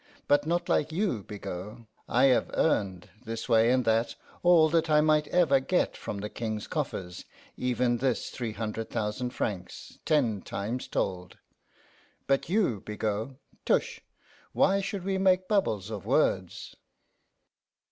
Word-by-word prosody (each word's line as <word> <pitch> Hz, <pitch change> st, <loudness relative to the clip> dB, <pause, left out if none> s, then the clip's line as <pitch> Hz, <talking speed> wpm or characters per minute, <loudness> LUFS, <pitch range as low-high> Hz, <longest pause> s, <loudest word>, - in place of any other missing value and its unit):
But 145 Hz, +1 st, +3 dB
not 175 Hz, +1 st, 0 dB
like 155 Hz, -, +1 dB
you, 175 Hz, -, -1 dB
Bigot. 100 Hz, +1 st, -7 dB, 0.3 s
I 125 Hz, -, +3 dB
have 130 Hz, -2 st, +4 dB
earned, 100 Hz, -, 0 dB
this 115 Hz, -1 st, -5 dB
way 115 Hz, -1 st, +4 dB
and 125 Hz, 0 st, +2 dB
that, 115 Hz, +1 st, +1 dB, 0.3 s
all 175 Hz, -3 st, +6 dB
that 165 Hz, 0 st, +1 dB
I 150 Hz, 0 st, +5 dB
might 150 Hz, -1 st, +3 dB
ever 160 Hz, -7 st, +3 dB
get 180 Hz, +7 st, 0 dB
from 105 Hz, -, -6 dB
the 105 Hz, -, -3 dB
King's 110 Hz, -1 st, -4 dB
coffers 90 Hz, -1 st, -4 dB, 0.3 s
even 125 Hz, -1 st, 0 dB
this 125 Hz, -1 st, -1 dB
three 115 Hz, -4 st, -4 dB
hunder' 110 Hz, +1 st, -3 dB
thousan' 110 Hz, +3 st, -3 dB
francs, 95 Hz, -7 st, -5 dB
ten 125 Hz, -11 st, +1 dB
times 105 Hz, +8 st, -4 dB
told. 90 Hz, -1 st, -3 dB, 0.9 s
But 135 Hz, +2 st, +1 dB
you, 180 Hz, -, +1 dB
Bigot 105 Hz, +4 st, -3 dB, 0.3 s
tush! -, -, 0 dB, 0.5 s
why 195 Hz, +1 st, +3 dB
should 200 Hz, -1 st, -4 dB
we 190 Hz, 0 st, -1 dB
make 185 Hz, -1 st, +3 dB
bubbles 110 Hz, -, 0 dB
of 105 Hz, -5 st, -5 dB
words? -, -, 0 dB
125 Hz, 140 wpm, -28 LUFS, 105-155 Hz, 0.9 s, all